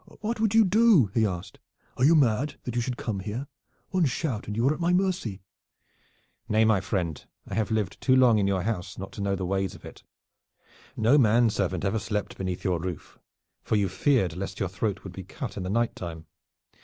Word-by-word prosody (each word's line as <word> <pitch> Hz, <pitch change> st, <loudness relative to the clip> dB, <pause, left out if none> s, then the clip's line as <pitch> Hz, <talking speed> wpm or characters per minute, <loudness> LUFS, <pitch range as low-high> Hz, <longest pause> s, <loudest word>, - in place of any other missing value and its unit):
"What 220 Hz, +2 st, -2 dB
would 220 Hz, -1 st, +1 dB
you 225 Hz, -1 st, +7 dB
do?" 195 Hz, -, +5 dB
he 110 Hz, -2 st, +3 dB
asked. 90 Hz, -3 st, -6 dB, 0.4 s
"Are -, -, -1 dB
you 160 Hz, +5 st, +6 dB
mad, 135 Hz, 0 st, +2 dB
that 125 Hz, -, -4 dB
you 120 Hz, -, +1 dB
should 125 Hz, 0 st, -3 dB
come 105 Hz, -4 st, -3 dB
here. 105 Hz, +8 st, -4 dB, 0.4 s
One 185 Hz, -3 st, +2 dB
shout 130 Hz, -4 st, -2 dB
and 105 Hz, -, -4 dB
you 115 Hz, +4 st, +2 dB
are 145 Hz, -, +3 dB
at 155 Hz, -, -8 dB
my 170 Hz, +1 st, +2 dB
mercy." 180 Hz, -, -1 dB, 1.1 s
"Nay, 110 Hz, +1 st, +4 dB
my 110 Hz, -4 st, +3 dB
friend, 90 Hz, -6 st, -2 dB, 0.2 s
I -, -, -8 dB
have 110 Hz, -2 st, 0 dB
lived 110 Hz, -5 st, -2 dB
too 130 Hz, -, +4 dB
long 125 Hz, -4 st, +5 dB
in 100 Hz, -, +1 dB
your 95 Hz, -2 st, 0 dB
house 95 Hz, -3 st, -3 dB
not 95 Hz, 0 st, -7 dB
to 105 Hz, -, -7 dB
know 100 Hz, 0 st, 0 dB
the 95 Hz, -1 st, -3 dB
ways 95 Hz, 0 st, -1 dB
of -, -, -14 dB
it. -, -, -11 dB, 1.0 s
No 120 Hz, +7 st, +4 dB
man 115 Hz, -1 st, +4 dB
servant 95 Hz, -2 st, -1 dB
ever 100 Hz, +3 st, 0 dB
slept 105 Hz, -1 st, -3 dB
beneath 95 Hz, -2 st, -4 dB
your 90 Hz, -3 st, 0 dB
roof, 90 Hz, -1 st, -7 dB, 0.4 s
for -, -, -1 dB
you 100 Hz, -2 st, +2 dB
feared 95 Hz, -, +1 dB
lest 95 Hz, +1 st, -5 dB
your 95 Hz, -, -1 dB
throat 95 Hz, +2 st, -3 dB
would 95 Hz, -, -8 dB
be 95 Hz, -, -7 dB
cut 90 Hz, -, -7 dB
in 100 Hz, -, -4 dB
the 90 Hz, -, -4 dB
night 115 Hz, +3 st, 0 dB
time. 80 Hz, -2 st, -7 dB
105 Hz, 215 wpm, -27 LUFS, 95-130 Hz, 1.1 s, you